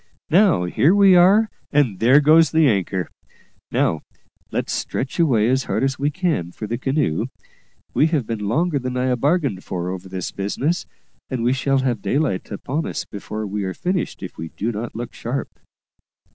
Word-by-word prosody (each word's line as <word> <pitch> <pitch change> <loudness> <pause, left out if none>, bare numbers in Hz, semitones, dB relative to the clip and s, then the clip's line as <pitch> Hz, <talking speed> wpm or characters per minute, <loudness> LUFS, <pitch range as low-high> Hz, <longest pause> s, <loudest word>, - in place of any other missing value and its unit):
Now, 180 - +4
here 115 - +3
we 195 -2 +6
are, 195 +5 +6 0.2
and 130 -11 +2
there 125 +6 +6
goes 155 +1 +5
the 160 +1 +4
anchor. 95 -5 0 0.6
Now, 80 - +1 0.5
let's - - -2
stretch 130 +5 -3
away 120 -10 +3
as 130 +2 +1
hard - - -1
as 135 -1 0
we 145 +1 +1
can 150 - -1
for 110 - -7
the 115 +3 -3
canoe; 135 - 0 0.7
we 150 - +4
have 155 -7 0
been 105 -3 -3
longer 155 - +1
than 125 0 -4
I 125 0 +1
bargained 140 - 0
for 90 0 -3
over 95 0 -7
this 95 -1 -4
business, 135 - -2 0.4
and 130 -3 -2
we 125 +2 +3
shall 135 +1 +1
have 125 -5 -1
daylight 135 -8 -1
upon 135 +9 -3
us - - -4
before 105 +1 -6
we 105 0 -3
are 95 -1 -3
finished 180 - -2
if 90 - -8
we 80 - -4
do 115 +8 -3
not 110 +1 -5
look 120 +1 -6
sharp." 125 +4 -4
130 Hz, 180 wpm, -21 LUFS, 105-150 Hz, 0.7 s, we